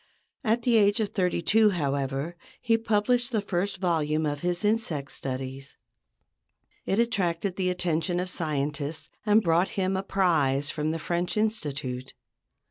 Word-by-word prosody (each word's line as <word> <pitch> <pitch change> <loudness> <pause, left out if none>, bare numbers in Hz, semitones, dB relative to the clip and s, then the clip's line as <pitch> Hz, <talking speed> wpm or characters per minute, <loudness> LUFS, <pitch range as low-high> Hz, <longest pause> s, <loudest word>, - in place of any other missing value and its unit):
At 230 0 +1
the 235 -2 +4
age 205 +1 +4
of 215 -2 0
thirty 180 -4 0
two, 215 +4 +5
however, 140 -2 -2 0.2
he 230 -2 +2
published 230 +3 +1
the 220 - +1
first 195 0 -2
volume 160 -4 +1
of 145 -1 -1
his 175 +4 -1
insect 180 -11 0
studies. 135 +1 -5 1.1
It 195 - +1
attracted 195 -5 0
the 185 -1 0
attention 175 -1 0
of 180 - -2
scientists 150 -1 -2 0.2
and 210 +1 +5
brought 170 +2 +3
him 190 0 +1
a 190 - 0
prize 155 -8 +1
from 150 -1 -2
the 160 - -1
French 175 +4 -2
Institute. 145 - -2
175 Hz, 145 wpm, -27 LUFS, 150-205 Hz, 1.1 s, two